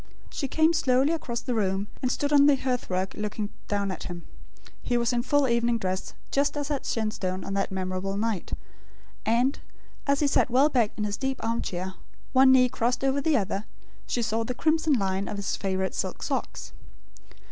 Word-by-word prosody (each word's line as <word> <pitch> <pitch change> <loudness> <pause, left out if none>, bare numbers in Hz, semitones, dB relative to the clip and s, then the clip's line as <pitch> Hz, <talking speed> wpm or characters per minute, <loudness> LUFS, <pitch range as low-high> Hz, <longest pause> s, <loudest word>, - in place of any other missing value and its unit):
She 275 - -2
came 315 +4 +3
slowly 275 -1 +3
across 240 -7 -3
the 250 - -2
room, 195 -3 0 0.2
and 255 - +1
stood 290 +1 0
on 285 0 +7
the 290 - +6
hearth 255 -2 -2
rug 185 +1 -1
looking 210 0 -3 0.2
down 200 -1 0
at 185 - -6
him. 175 -1 -6 0.6
He 245 - 0
was 235 0 +1
in 240 - +2
full 285 +2 +2
evening 235 0 +2
dress; 185 -3 -3 0.2
just 285 +1 +1
as 290 0 -2
at 280 - -2
Shenstone 190 -4 -2
on 195 - -4
that 195 0 -1
memorable 190 +1 -2
night; 215 -4 -2 0.7
and, 245 +5 +2 0.5
as 280 +1 +2
he - - +4
sat 275 - +3
well 265 +5 +4
back 240 -7 +2
in 210 - -1
his 205 -1 -2
deep 265 -1 -2
arm 230 +1 0
chair, 185 +1 -4 0.4
one 260 0 +7
knee 255 -1 +6
crossed 245 0 -1
over 270 +1 +2
the 300 0 +3
other, 200 0 -2 0.4
she 240 - 0
saw 225 +1 0
the 250 +2 -4
crimson 315 +1 +2
line 195 -4 0
of 205 - -4
his 200 - -1
favourite 190 -1 -1
silk - - -3
socks. - - -3
235 Hz, 195 wpm, -27 LUFS, 195-270 Hz, 0.7 s, on